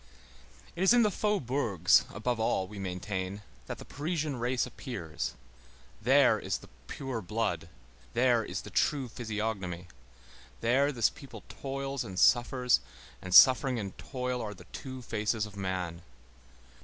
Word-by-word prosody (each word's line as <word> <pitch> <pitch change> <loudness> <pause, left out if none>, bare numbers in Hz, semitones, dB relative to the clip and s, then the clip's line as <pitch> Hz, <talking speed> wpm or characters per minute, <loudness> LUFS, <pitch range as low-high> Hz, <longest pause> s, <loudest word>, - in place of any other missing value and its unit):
It 175 - -5
is 190 +5 +6
in 240 - +6
the 210 - +3
faubourgs, 130 - +2
above 120 +2 -2
all, 95 -4 +1
we 105 +1 -9
maintain, 95 +1 -4 0.2
that - - -5
the - - -10
Parisian 150 -2 -2
race 125 +1 0
appears; 85 - -5 0.7
there - - +5
is - - -2
the - - -15 0.2
pure 130 -5 -4
blood; 90 -5 -2 0.5
there 120 -1 +4
is 95 -2 -4
the - - -10
true 140 -4 +1
physiognomy; 105 -7 -4 0.7
there 135 +5 +3
this 120 -6 +2
people 140 -3 -11
toils 135 0 -4
and 95 -1 -8
suffers, 125 +3 +4 0.4
and 95 - -7
suffering 130 0 +8
and 100 -4 -5
toil 125 -2 -3
are 105 -1 -5
the 90 -1 -14
two 130 -2 -7
faces 110 -1 -1
of 105 -1 -11
man. 95 -3 -3
115 Hz, 145 wpm, -30 LUFS, 95-130 Hz, 0.7 s, suffering